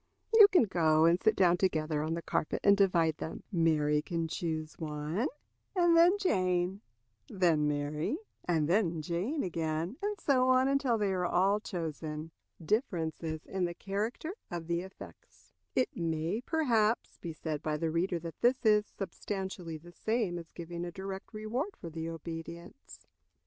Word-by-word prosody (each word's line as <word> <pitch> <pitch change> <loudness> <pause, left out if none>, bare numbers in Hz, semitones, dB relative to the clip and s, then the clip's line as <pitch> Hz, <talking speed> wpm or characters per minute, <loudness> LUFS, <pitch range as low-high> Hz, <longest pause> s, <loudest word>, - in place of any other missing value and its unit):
You 435 -2 +10
can 365 -9 +5
go 160 -6 +3
and 170 +2 +4
sit 220 - +3
down 180 -2 +4
together 155 -5 0
on 160 +2 -1
the 170 - -5
carpet - - -1
and 200 - +7
divide 170 -6 +3
them. 160 - -6
Mary 155 -4 +2
can 165 +1 -2
choose 160 -1 -3
one, 155 - -2 0.5
and 345 -2 +4
then 345 +4 +6
Jane; 185 - +1 0.5
then 165 -6 +2
Mary, 150 - -1 0.3
and 160 -4 +1
then 170 -3 +1
Jane 185 - -1
again; 165 +3 -2
and 410 0 -2
so 260 -2 +3
on 255 +1 +5
until 275 -4 +2
they 205 -3 +1
are 180 -1 0
all 195 +4 +3
chosen." 160 -4 -5 0.3
Difference 175 - 0
in 165 +3 -3
the 170 0 -4
Character 215 - -3 0.2
of 170 -1 -5
the 170 +1 -1
Effects. 190 +1 -13 0.2
It 255 - +1
may, 165 +4 -1
perhaps, 235 -9 +1
be 170 - -5
said 155 -1 -4
by 155 -1 -1
the 160 +1 -1
reader 175 +2 0
that 165 -2 -8
this 245 +1 +2
is 210 -1 +5
substantially 190 -4 -5
the 175 +3 -15
same 220 -4 -1
as 165 - -11
giving 170 0 -6
a 175 - -4
direct 190 +2 -7
reward 235 - -3
for 170 - -7
the 160 +1 -4
obedience. 165 - -8
175 Hz, 160 wpm, -31 LUFS, 160-210 Hz, 0.5 s, You